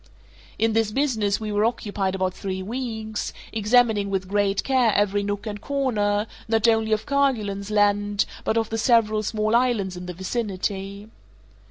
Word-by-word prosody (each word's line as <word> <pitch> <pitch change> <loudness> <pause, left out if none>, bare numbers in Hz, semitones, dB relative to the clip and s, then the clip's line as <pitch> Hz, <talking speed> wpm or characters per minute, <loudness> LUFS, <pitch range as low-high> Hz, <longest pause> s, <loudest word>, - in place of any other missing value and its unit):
In 225 0 +2
this 225 -1 +2
business 220 -6 0
we 215 -1 -4
were 205 0 +1
occupied 205 -4 -1
about 185 -1 -1
three 190 -1 -4
weeks, 220 -1 -4 0.2
examining 220 -2 +3
with 190 -1 -2
great 200 0 +1
care 255 -4 +3
every 205 0 +2
nook 205 +1 -3
and 205 -2 -5
corner, 215 -7 0 0.2
not 225 0 +2
only 225 -1 +2
of 215 0 +1
Kerguelen's 220 -8 0
Land, 205 -1 +2 0.2
but 220 - 0
of 225 -1 0
the 225 - -1
several 220 -2 +3
small 215 +1 0
islands 235 -7 +1
in 180 0 -7
the 180 - -5
vicinity. 200 0 -3
210 Hz, 160 wpm, -24 LUFS, 200-225 Hz, 0.2 s, examining